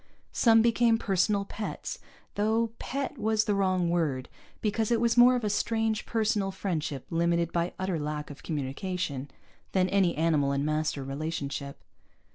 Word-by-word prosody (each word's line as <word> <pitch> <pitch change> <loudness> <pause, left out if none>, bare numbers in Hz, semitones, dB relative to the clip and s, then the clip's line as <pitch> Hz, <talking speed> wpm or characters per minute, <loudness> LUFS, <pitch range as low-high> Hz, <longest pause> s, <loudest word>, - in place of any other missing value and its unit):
Some 225 -2 +5
became 230 0 +4
personal 200 -1 +1
pets, 220 - -5 0.3
though 220 +2 +1
"pet" 275 0 -4
was 220 0 +2
the 210 - +1
wrong 185 -3 +1
word, 155 -7 0 0.3
because 215 0 0
it 235 -1 +2
was 235 0 +2
more 245 +1 +7
of 245 - -2
a 210 - +1
strange 220 0 0
personal 215 -3 +1
friendship 160 -8 -3
limited 170 0 +1
by 170 +1 -1
utter 185 -3 -1
lack 150 0 -4
of 145 - -11
communication, 145 0 -3 0.4
than 185 -1 +3
any 190 -5 +2
animal 150 -4 +2
and 140 +1 0
master 155 -2 -1
relationship. 140 0 -4
185 Hz, 150 wpm, -28 LUFS, 155-220 Hz, 0.4 s, more